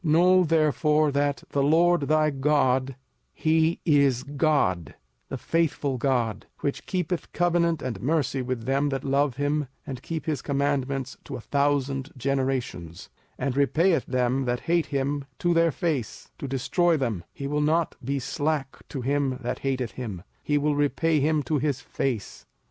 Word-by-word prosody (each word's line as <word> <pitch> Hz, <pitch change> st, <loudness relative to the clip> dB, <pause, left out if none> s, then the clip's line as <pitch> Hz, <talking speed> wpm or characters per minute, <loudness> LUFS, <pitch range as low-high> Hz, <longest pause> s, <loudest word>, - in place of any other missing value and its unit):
05:007:009 155 Hz, -, +1 dB
Know 180 Hz, +3 st, +5 dB
therefore 155 Hz, -1 st, +2 dB
that 140 Hz, 0 st, 0 dB
the 140 Hz, -, +1 dB
LORD 170 Hz, +4 st, +4 dB
thy 155 Hz, 0 st, +3 dB
God, 135 Hz, -2 st, +1 dB, 0.4 s
he 160 Hz, +1 st, +2 dB
is 140 Hz, -6 st, +3 dB
God, 140 Hz, -, 0 dB, 0.3 s
the 135 Hz, -, -4 dB
faithful 145 Hz, -3 st, 0 dB
God, 120 Hz, -5 st, 0 dB
which 140 Hz, -, -3 dB
keepeth 180 Hz, -2 st, -2 dB
covenant 170 Hz, -2 st, +1 dB
and 115 Hz, -7 st, -4 dB
mercy 140 Hz, -1 st, 0 dB
with 125 Hz, -2 st, -3 dB
them 135 Hz, +2 st, +1 dB
that 135 Hz, -1 st, -3 dB
love 140 Hz, -1 st, +1 dB
him 145 Hz, +1 st, 0 dB, 0.2 s
and 130 Hz, -3 st, -6 dB
keep 160 Hz, +1 st, -5 dB
his 150 Hz, -5 st, -1 dB
commandments 140 Hz, -2 st, -1 dB
to 140 Hz, -, -6 dB
a -, -, -5 dB
thousand 140 Hz, 0 st, 0 dB
generations; 130 Hz, -10 st, -2 dB, 0.3 s
05:007:010 -, -, -2 dB
And 135 Hz, -1 st, -1 dB
repayeth 160 Hz, +5 st, +3 dB
them 125 Hz, +1 st, 0 dB
that 120 Hz, 0 st, -1 dB
hate 170 Hz, -2 st, +1 dB
him 140 Hz, 0 st, -1 dB
to 175 Hz, 0 st, +1 dB
their 165 Hz, 0 st, +4 dB
face, 150 Hz, -, -3 dB
to 140 Hz, -, -4 dB
destroy 160 Hz, +6 st, +1 dB
them: 115 Hz, -, -2 dB
he 140 Hz, -, -7 dB
will 150 Hz, +1 st, 0 dB
not 160 Hz, +2 st, +1 dB
be 140 Hz, +3 st, -1 dB
slack 145 Hz, +1 st, -2 dB
to 135 Hz, -, -4 dB
him 135 Hz, 0 st, 0 dB
that 120 Hz, -, -3 dB
hateth 130 Hz, -4 st, -2 dB
him, 105 Hz, -9 st, -6 dB, 0.2 s
he 145 Hz, -, +1 dB
will 145 Hz, +1 st, +1 dB
repay 145 Hz, +2 st, +2 dB
him 150 Hz, +1 st, +1 dB
to 150 Hz, 0 st, 0 dB
his 140 Hz, -2 st, 0 dB
face. 125 Hz, -3 st, -4 dB
140 Hz, 165 wpm, -26 LUFS, 130-155 Hz, 0.4 s, Know